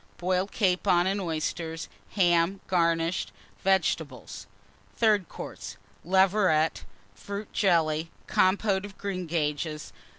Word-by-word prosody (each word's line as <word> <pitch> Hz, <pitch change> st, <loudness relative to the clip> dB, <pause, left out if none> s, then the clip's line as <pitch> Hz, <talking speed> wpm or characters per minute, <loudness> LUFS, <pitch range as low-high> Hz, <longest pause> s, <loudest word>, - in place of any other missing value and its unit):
Boiled 185 Hz, +2 st, 0 dB
Capon 180 Hz, -3 st, +2 dB
and 195 Hz, +1 st, 0 dB
Oysters. 160 Hz, -1 st, -3 dB, 0.3 s
Ham, 175 Hz, 0 st, +3 dB
garnished. 170 Hz, -1 st, +1 dB, 0.3 s
Vegetables. 190 Hz, 0 st, -1 dB, 0.5 s
THIRD 210 Hz, -6 st, +2 dB
COURSE. -, -, -8 dB, 0.3 s
Leveret. 185 Hz, -3 st, +2 dB, 0.3 s
Fruit 200 Hz, +1 st, -7 dB
Jelly. 165 Hz, -4 st, +2 dB, 0.2 s
Compote 190 Hz, +1 st, +2 dB
of 205 Hz, -1 st, -9 dB
Greengages. 160 Hz, -5 st, -3 dB
180 Hz, 90 wpm, -27 LUFS, 165-195 Hz, 0.5 s, Ham